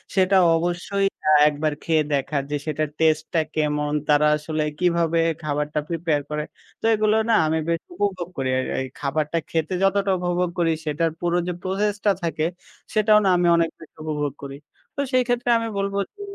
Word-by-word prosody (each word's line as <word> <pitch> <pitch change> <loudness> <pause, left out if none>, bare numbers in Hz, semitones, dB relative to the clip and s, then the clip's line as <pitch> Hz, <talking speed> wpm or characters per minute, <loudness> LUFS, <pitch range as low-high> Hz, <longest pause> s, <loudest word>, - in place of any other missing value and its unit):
সেটা 190 0 +4 0.2
অবশ্যই 175 +4 -1 0.2
আ - - +6 0.2
একবার 150 +1 -1
খেয়ে 160 -2 +2
দেখার 140 0 0
যে - - 0
সেটার 155 -1 -1
টেস্ট 155 -1 +3
টা 165 - +3
কেমন? 150 -1 0 0.2
তারা 150 0 +4
আসলে 155 0 -2 0.2
কিভাবে 170 -2 +2 0.2
খাবারটা 150 0 -1
প্রিপেয়ার 165 -3 0
করে? 150 0 -2 0.4
তো - - -4
এগুলো 215 0 +2
না - - +4
আমি 160 +1 +1
বেশ 165 -1 0
উপভোগ 185 -2 -2
করি। 135 -1 -1
আর 130 - -2
এই 130 - -3
খাবারটা 150 +3 -1
খেতে 160 +2 -1
যতটা 195 0 +2
উপভোগ 175 0 0
করি 165 -1 +3
সেটার 155 +2 0
পুরো 175 0 0
যে 180 - -1
প্রসেসটা 205 +2 0
থাকে 160 -2 -1 0.5
সেটাও 215 0 +5
না - - +4
আমি 175 0 +2
অনেক 165 -1 +2
বেশ 160 - -14
উপভোগ 150 -3 -2
করি। 140 0 -6 0.4
তো - - -1
সেই 255 0 +4
ক্ষেত্রে 245 0 0
আমি 230 - -3
বলবো 200 0 -2 0.2
যে 410 - -12
165 Hz, 180 wpm, -23 LUFS, 150-190 Hz, 0.5 s, আ